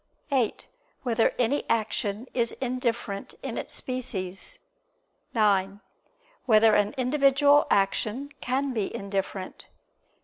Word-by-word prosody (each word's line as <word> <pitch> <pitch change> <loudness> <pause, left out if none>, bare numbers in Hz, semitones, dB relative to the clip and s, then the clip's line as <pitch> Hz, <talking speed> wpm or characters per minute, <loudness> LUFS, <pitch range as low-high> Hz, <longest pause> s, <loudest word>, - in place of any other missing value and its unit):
(8) 250 -6 0 0.4
Whether 230 -3 +2
any 250 +4 +1
action 220 0 0
is 235 -2 0
indifferent 240 -5 -3
in - - -4
its - - -5
species? 225 - -4 0.8
(9) 200 -2 +2 0.7
Whether 220 -1 +6
an 205 0 +2
individual 280 +2 +4
action 215 +7 0
can 265 +2 0
be 215 -5 -1
indifferent? 195 -1 -4
230 Hz, 100 wpm, -27 LUFS, 200-255 Hz, 0.8 s, Whether